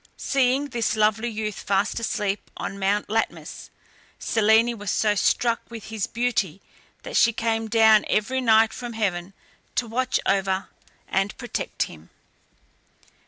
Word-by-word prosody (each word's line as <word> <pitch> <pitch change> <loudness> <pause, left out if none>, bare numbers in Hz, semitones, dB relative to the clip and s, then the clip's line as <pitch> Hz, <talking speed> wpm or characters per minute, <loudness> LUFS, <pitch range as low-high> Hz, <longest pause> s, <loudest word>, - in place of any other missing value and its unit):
Seeing 270 +1 +1
this 235 -4 -1
lovely 215 +2 +2
youth 215 -2 -4
fast 200 +3 0
asleep 210 -3 -2
on 200 - -5
Mount 200 +2 0
Latmus, 225 +1 -3 0.5
Selene 225 +2 +3
was 205 -1 -4
so 215 -1 +2
struck 230 +4 +1
with 230 -3 -9
his 215 -4 -1
beauty, 230 -7 -1 0.4
that - - -7
she 235 - +5
came 225 0 -1
down 220 -1 +5
every 255 +5 +1
night 225 -2 +4
from 240 -1 -6
heaven 190 -4 -2 0.4
to 245 - +1
watch 255 +3 0
over 195 -1 0 0.4
and 195 +2 -1
protect 245 - -3
him. - - -11
220 Hz, 135 wpm, -24 LUFS, 205-235 Hz, 0.5 s, she